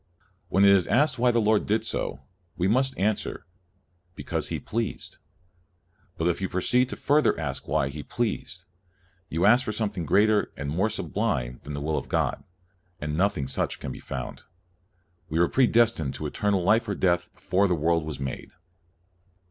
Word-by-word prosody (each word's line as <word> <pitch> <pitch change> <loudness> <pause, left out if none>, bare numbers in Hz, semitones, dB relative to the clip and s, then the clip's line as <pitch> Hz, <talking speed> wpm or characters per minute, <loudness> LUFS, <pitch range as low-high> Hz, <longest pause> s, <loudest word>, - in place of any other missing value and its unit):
" 90 0 -40
When 95 +1 +4
it 100 - +7
is 95 -3 +4
asked 130 -1 +2
why 125 +1 +4
the 120 -1 +3
Lord 110 -1 +2
did 110 +2 +1
so, 70 - -2 0.4
we 90 - +1
must 130 +5 +2
answer, 105 +2 -1 0.7
Because - - -3
He - - -3
pleased. 115 0 -4 1.0
But 80 - 0
if 90 +2 0
you 95 - -1
proceed 125 +7 +1
further 150 +2 +3
to - - -9
ask 70 -4 -4
why 70 -1 +1
He 75 +2 -6
pleased, 105 -3 -3 0.7
you 85 +4 0
ask 120 +5 +6
for 110 - -3
something 105 -7 -3
greater 105 +5 +3
and 70 0 -4
more 95 +8 +1
sublime - - -2
than 75 - -8
the 70 - -4
will 75 +1 0
of - - -11
God, - - 0 0.6
and 75 0 -3
nothing 90 -5 +1
such - - -2
can 70 - -5
be - - -8
found." - - -6 0.9
We 80 - -2
were 85 +1 +4
predestined 115 - +2
to - - -5
eternal 100 -3 0
life 110 +4 +3
or 100 - -1
death 85 -1 +1
before 100 +1 +1
the 90 - +1
world 80 +1 +1
was 75 -2 -5
made. 70 -1 -5
95 Hz, 180 wpm, -26 LUFS, 80-110 Hz, 1.0 s, it